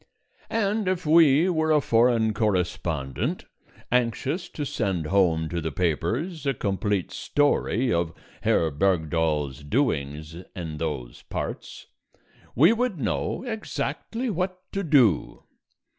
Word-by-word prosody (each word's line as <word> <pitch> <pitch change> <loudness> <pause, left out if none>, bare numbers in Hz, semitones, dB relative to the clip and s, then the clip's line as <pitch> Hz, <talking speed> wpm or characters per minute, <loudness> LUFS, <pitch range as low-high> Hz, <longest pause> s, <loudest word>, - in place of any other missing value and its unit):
And 215 -2 0
if 185 -2 -1
we 155 0 +6
were 160 -3 +1
a 150 - +5
foreign 115 -3 +3
correspondent, 85 - -1 0.5
anxious 125 - 0
to 145 - -4
send 95 - -1
home 80 -2 +2
to 85 +1 -2
the 80 0 -3
papers 115 - -1
a 135 - +1
complete 100 -2 -1
story 135 -4 +1
of 85 -1 0 0.3
Herr 80 -1 +2
Bergdoll's 80 -4 0
doings 75 - -1 0.2
in 80 -4 -5
those 70 -7 -4
parts, - - -6 0.7
we 165 - +6
would 235 -4 -1
know - - -2
exactly 220 - -3
what 185 0 -3
to 195 - -2
do. 135 - +3
115 Hz, 115 wpm, -25 LUFS, -, 0.7 s, we